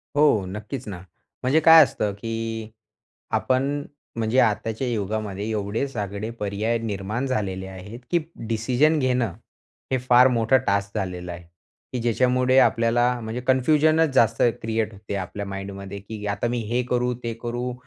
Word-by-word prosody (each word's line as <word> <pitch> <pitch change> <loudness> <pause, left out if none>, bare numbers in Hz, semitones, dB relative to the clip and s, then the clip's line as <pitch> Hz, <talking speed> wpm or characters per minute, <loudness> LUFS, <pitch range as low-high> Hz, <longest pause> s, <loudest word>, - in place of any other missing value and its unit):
हो. 145 -10 +4
नक्कीच 105 +6 -6
ना. 100 - -5 0.5
म्हणजे 135 +5 +3
काय 160 0 +9
असतं, 105 -5 -2
की 115 +1 -4 0.7
आपण 135 +3 0 0.3
म्हणजे 115 +2 0
आताच्या 110 +3 0
युगामध्ये 105 -2 -3
एवढे 105 +5 -1
सगळे 105 -2 -4
पर्याय 105 +3 -1
निर्माण 110 +3 -3
झालेले 95 -7 -2
आहेत 95 +4 -9
की 175 - +4 0.3
डिसिजन 125 +8 +2
घेणं, 125 -6 +1 0.6
हे 130 - +3
फार 125 +1 +7
मोठं 120 +1 +3
टास्क 100 +1 0
झालेलं 90 -2 -4
आहे. 85 0 -9 0.5
की 125 - -2
ज्याच्यामुळे 125 +2 +3
आपल्याला 120 +1 +3
म्हणजे 115 +2 -4
कन्फ्युजनच 155 +4 +3
जास्त 115 -3 +3 0.2
क्रिएट 110 -1 -1
होते 100 0 -7
आपल्या 100 +2 -5
माइंडमध्ये 100 0 -6
की 105 +1 -8
"आता 105 +3 -1
मी 120 +1 -1
हे 125 +1 +1
करू? 125 0 +1
ते 115 - -2
करू? 120 +1 -3
115 Hz, 145 wpm, -24 LUFS, 100-125 Hz, 0.7 s, काय